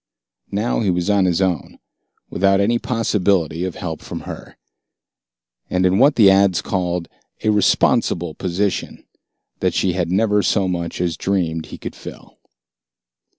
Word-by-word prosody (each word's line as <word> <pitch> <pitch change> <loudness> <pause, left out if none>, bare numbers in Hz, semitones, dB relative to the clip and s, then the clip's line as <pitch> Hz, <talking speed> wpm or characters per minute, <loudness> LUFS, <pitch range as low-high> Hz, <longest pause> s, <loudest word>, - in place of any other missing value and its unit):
Now 105 +4 -1
he 105 - 0
was 90 +2 0
on 100 -2 +3
his 90 +1 +1
own, 90 -5 -2 0.5
without 95 +1 +2
any 115 +4 +2
possibility 95 - 0
of 95 - -5
help 80 -4 -5
from - - -7
her. - - -9 1.1
And 90 0 +1
in 95 +2 +3
what 140 +3 +5
the 105 -4 +6
ads 95 -2 +3
called 90 -2 -2 0.4
a 110 - +3
"responsible 85 -4 +2
position" 95 +2 -3 0.5
that - - 0
she 90 - +1
had 90 -2 -1
never 105 +1 +2
so 100 -1 +1
much 85 -1 -3
as 85 -1 -1
dreamed 85 -5 -1
he - - -9
could - - -7
fill. - - -12
95 Hz, 150 wpm, -20 LUFS, 85-100 Hz, 1.1 s, the